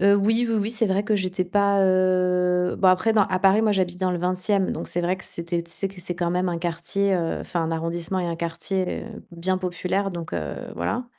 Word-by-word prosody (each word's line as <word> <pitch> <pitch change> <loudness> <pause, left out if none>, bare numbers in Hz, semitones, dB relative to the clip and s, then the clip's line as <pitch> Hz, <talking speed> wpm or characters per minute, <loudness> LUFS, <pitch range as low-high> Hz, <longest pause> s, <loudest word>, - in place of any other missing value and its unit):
Heu, 200 +1 +6
oui, 225 +4 +2
oui, 225 - +1
oui, 205 +2 -1
c'est 225 -1 +1
vrai 195 +2 +1
que 215 +1 +1
j'étais 185 -2 -1
pas, 200 +1 +2
heu 180 -1 +2
bon 190 - +4
après, 185 +5 +3
à 190 -3 +3
Paris, 195 +3 +4
moi, 215 - +3
j'habite 180 -2 -1
dans 185 -1 +1
le 180 - -1
20e, 185 +2 0
donc - - -5
c'est 175 - -1
vrai 175 +2 0
que 190 - -11
c'était 170 0 -3
tu 170 - -10
sais 195 - -1
que 190 -1 -12
c'est 175 0 -5
quand 170 -1 0
même 180 +1 0
un 170 -1 -2
quartier, 185 +3 0
heu 170 -2 -1
enfin 175 - -3
un 160 - -2
arrondissement 165 +3 -2
et 180 - -1
un 170 - -2
quartier 170 +3 -2 0.3
bien 175 +2 -1
populaire, 185 +2 -2
donc 170 -3 -7
heu, 75 -5 -3 0.2
voilà 85 - -2
185 Hz, 235 wpm, -24 LUFS, 175-195 Hz, 0.3 s, Heu